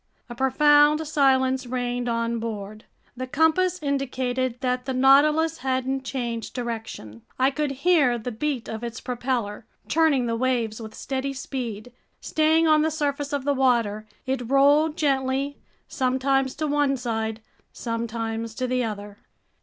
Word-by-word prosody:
A - - -6
profound 295 +4 +4
silence 265 -3 +2
reigned 245 0 -2
on 230 0 -1
board. 215 -2 -6 0.3
The 255 +1 -5
compass 320 +6 +2
indicated 255 -3 -1
that 250 -1 -1
the 265 -1 -2
Nautilus 300 +5 +4
hadn't 260 +1 -1
changed 235 -3 -4
direction. 225 - -6 0.2
I 260 +1 +3
could 300 +1 -1 0.2
hear 295 -9 +4
the 235 +2 -5
beat 260 +1 -3
of 220 +1 -6
its 235 -1 -5
propeller, 240 -4 -3 0.2
churning 305 -6 +3
the 230 -1 -1
waves 235 -3 -1
with 220 -1 -9
steady 275 +1 -3
speed. 245 -4 -5 0.3
Staying 320 +1 +2
on 310 -1 +5
the 315 - +2
surface 290 -1 -2
of 285 -2 -2
the 285 - +2
water, 235 -5 +1 0.2
it 260 -3 -2
rolled 290 +4 +4
gently, 275 -1 0 0.3
sometimes 265 0 0
to 310 - -2
one 290 -2 +1
side, 225 -3 -3 0.3
sometimes 230 -1 -4
to 255 - -2
the 250 0 0
other. 205 -2 -6
260 Hz, 145 wpm, -24 LUFS, 235-280 Hz, 0.3 s, on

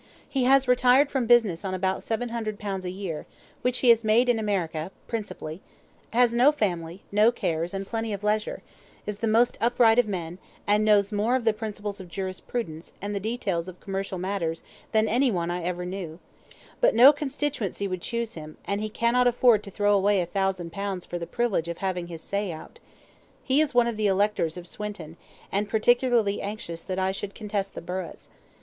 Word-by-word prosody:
He 270 -3 0
has 270 0 +5
retired 250 +3 +4
from 260 -4 0
business 220 -8 +4
on 190 -1 -2
about 190 +1 -1
700 230 -2 -3
pounds 195 -3 -4
a - - -2
year 180 -5 -5 0.3
which 250 0 +1
he - - +7
has 230 -1 +6
made 225 +3 +3
in 235 -2 +3
America, 175 -6 -2 0.2
principally 200 -7 -5 0.5
has 240 0 +3
no 250 +5 +6
family, 180 - -2
no 210 +3 +5
cares, 165 -6 -2
and 195 0 -4
plenty 225 +1 -3
of 200 0 -4
leisure 210 +1 -1 0.4
is 210 -1 -4
the 225 - -1
most 230 +3 +3
upright 235 0 +4
of 245 - +3
men, 175 -3 -4 0.3
and 210 +1 +3
knows 205 -1 +4
more 215 +4 +1
of 255 -3 -1
the 225 - +4
principles 210 -2 -5
of 185 - -9
jurisprudence, 185 -1 -5
and 205 +1 -4
the 200 - -1
details 195 -5 -2
of 180 -1 -9
commercial 195 -1 -4
matters 175 -3 -2 0.3
than 220 0 +3
any 250 +5 +3
one 175 -5 -1
I 175 0 -2
ever 180 +1 -3
knew; 180 -3 -5 0.6
but - - +4
no 255 +6 +9
constituency 275 - -2
would 185 -2 -4
choose 235 +1 -3
him, 155 -1 -9
and 200 +1 -1
he 215 - -2
cannot 235 +3 +2
afford 240 -3 +4
to - - -7
throw 205 +1 +2
away 200 0 +3
a 175 - 0
thousand 185 -1 -2
pounds 195 0 -4
for 175 - -5
the 170 - -5
privilege 235 -9 0
of 170 0 -4
having 180 -3 -2
his 165 -2 -9
say 200 -2 -2
out. 160 - -10 0.6
He 270 +3 +3
is 295 -4 -1
one 245 -1 +6
of 235 -2 -2
the 215 -1 +2
electors 195 -4 +1
of 175 - -8
Swinton, 180 -5 -7 0.4
and 205 +2 -1
particularly 235 -2 +2
anxious 200 -5 -5
that 185 +1 -5
I 190 0 +1
should 195 +1 -6
contest 205 -2 -3
the - - -5
burghs. 180 0 -6
205 Hz, 195 wpm, -26 LUFS, 185-235 Hz, 0.6 s, no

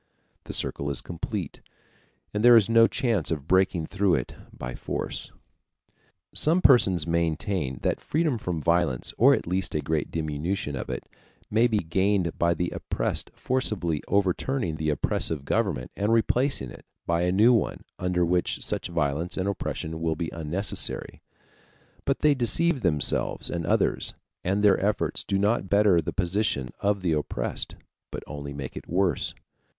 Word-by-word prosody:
The - - -6
circle 70 - 0
is 70 -3 +1
complete, 85 -2 -5 0.7
and 105 +1 -1
there 120 0 +9
is 110 -4 +6
no 115 0 +6
chance 115 - 0
of 75 -3 -3
breaking 95 -2 +2
through 100 0 +1
it - - -3 0.2
by - - -7
force. - - -4 1.0
Some 165 +4 +2
persons 95 - +5
maintain 85 -3 -1
that - - 0
freedom 155 -6 0
from 90 -5 -3
violence, 85 -5 +1
or - - +7
at - - -4
least 90 0 -1
a - - +2
great 80 0 -1
diminution 80 0 -2
of - - -5
it, - - -4 0.5
may 115 +3 +4
be 110 -3 +1
gained 95 0 0
by 85 0 +3
the 90 +2 -2
oppressed - - -2
forcibly 100 - -1
overturning 100 - 0
the 80 0 -1
oppressive 75 0 0
government 90 - -1
and 105 +2 0
replacing 115 - +1
it - - -14 0.2
by 85 0 +1
a 90 0 +1
new 110 +6 +5
one 115 - 0 0.2
under 90 -1 +1
which 90 +1 0
such - - -2
violence 80 0 -1
and 95 +1 -1
oppression 80 -4 -4
will 80 -1 0
be 80 0 -4
unnecessary, 85 +5 -2 0.8
but 135 - 0
they 150 -1 +5
deceive 140 +4 +2
themselves 80 -7 0
and 85 -2 -3
others, - - +1 0.3
and 100 +3 0
their 100 -2 +4
efforts 105 +1 0
do 100 - -1
not 100 -1 +1
better 100 -3 +4
the 75 - -4
position 90 -8 -1
of 100 -1 0
the 85 - +1
oppressed, 75 -1 -2 0.3
but - - -6
only 70 -1 -7
make 70 -2 -6
it - - -9
worse. 95 +1 +1
90 Hz, 160 wpm, -26 LUFS, 80-105 Hz, 1.0 s, there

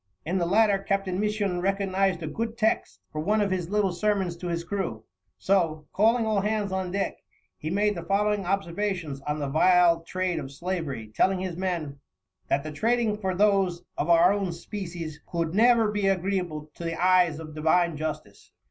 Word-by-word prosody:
In 180 +4 0
the 170 - 0
latter 205 +1 +4
Captain 195 -1 -1
Misson 205 -4 0
recognized 195 -2 0
a - - -3
good 225 +7 -4
text 220 -1 0
for 155 - -3
one 210 +7 +1
of 205 -2 +1
his 180 -3 -2
little 205 -2 +1
sermons 190 -1 0
to 180 - -6
his 170 -1 -2
crew, 170 - -3 0.3
so, 165 -6 +1
calling 225 +3 +3
all 215 -2 +1
hands 210 -1 -1
on 190 -1 -2
deck, 195 +2 -2 0.4
he 155 - -5
made 205 +4 +2
the 170 - -5
following 205 +2 +1
observations 180 -5 -2
on 150 +1 -1
the 145 -2 -2
vile 170 +3 +4
trade 185 0 -2
of 135 - -7
slavery, 140 -9 -4
telling 190 - +2
his 185 -2 -4
men: 170 -6 -3 0.5
"That 140 - +1
the 155 - -5
Trading 225 +6 +1
for 190 -3 -1
those 195 -3 +2
of 150 - -2
our 170 +3 +6
own 195 -4 -2
Species, 170 -4 -6
cou'd 165 -2 -1
never 225 0 +4
be 205 -2 0
agreeable 180 -5 -1
to - - -9
the 165 -1 -3
Eyes 180 -3 +4
of 155 -1 -8
divine 160 +2 +2
Justice. 155 0 -6
185 Hz, 185 wpm, -26 LUFS, 165-200 Hz, 0.5 s, our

